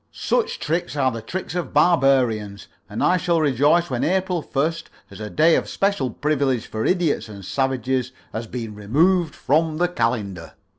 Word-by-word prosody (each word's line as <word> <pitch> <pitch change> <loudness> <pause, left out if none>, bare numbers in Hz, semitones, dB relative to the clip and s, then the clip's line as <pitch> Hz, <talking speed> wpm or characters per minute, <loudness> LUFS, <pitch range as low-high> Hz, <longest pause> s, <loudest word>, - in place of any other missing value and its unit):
Such 480 -3 -1
tricks 170 +1 -2
are 135 -3 +2
the 115 -1 -6
tricks 180 +10 -5
of 175 -6 -4
barbarians, 130 - +2 0.2
and - - -3
I 185 - +4
shall 170 -1 +1
rejoice 150 +3 +2
when 120 - -1
April 185 -1 0
1st 160 +4 -2 0.3
as - - -11
a 105 -1 -5
day 160 +6 +4
of - - -1
special 195 -10 0
privilege 140 -2 0
for 110 0 -4
idiots 175 - 0
and 100 -3 -10
savages 130 0 -1 0.2
has 115 +1 -4
been 115 -2 -6
removed 155 - +1
from 155 +2 +1
the 175 +2 +2
calendar." 110 - -2
140 Hz, 165 wpm, -22 LUFS, 115-170 Hz, 0.3 s, I